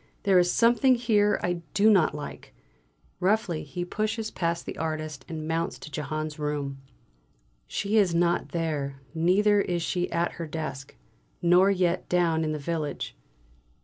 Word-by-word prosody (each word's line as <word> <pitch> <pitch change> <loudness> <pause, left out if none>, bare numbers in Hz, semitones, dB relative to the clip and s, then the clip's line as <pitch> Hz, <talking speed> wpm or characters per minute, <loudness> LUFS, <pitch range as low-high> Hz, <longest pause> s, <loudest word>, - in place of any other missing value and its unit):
There 195 -3 +5
is 175 0 +3
something 240 +3 +4
here 215 -4 +2
I 175 -1 -1
do 205 +1 +4
not 190 -8 +4
like!" 150 - -8 0.6
Roughly 190 -3 +1
he 175 +4 -5
pushes 215 +3 -2
past 170 -1 -2
the - - -6
artist 155 -3 -3
and 155 -1 -5
mounts 165 +1 -1
to 150 - -11
Jehane's 155 +1 -4
room. 145 -2 -3 0.9
She 205 - -1
is 190 -5 +3
not 170 0 +1
there, 150 -5 -2
neither 200 +5 +3
is 175 -3 -1
she 180 +1 -1
at 170 +1 0
her 165 - -4
desk. 150 -4 -6 0.4
Nor 180 +3 +5
yet 180 -2 0
down 170 -2 +2
in 155 - -1
the 155 - -2
village. 155 0 -3
170 Hz, 150 wpm, -27 LUFS, 155-195 Hz, 0.9 s, There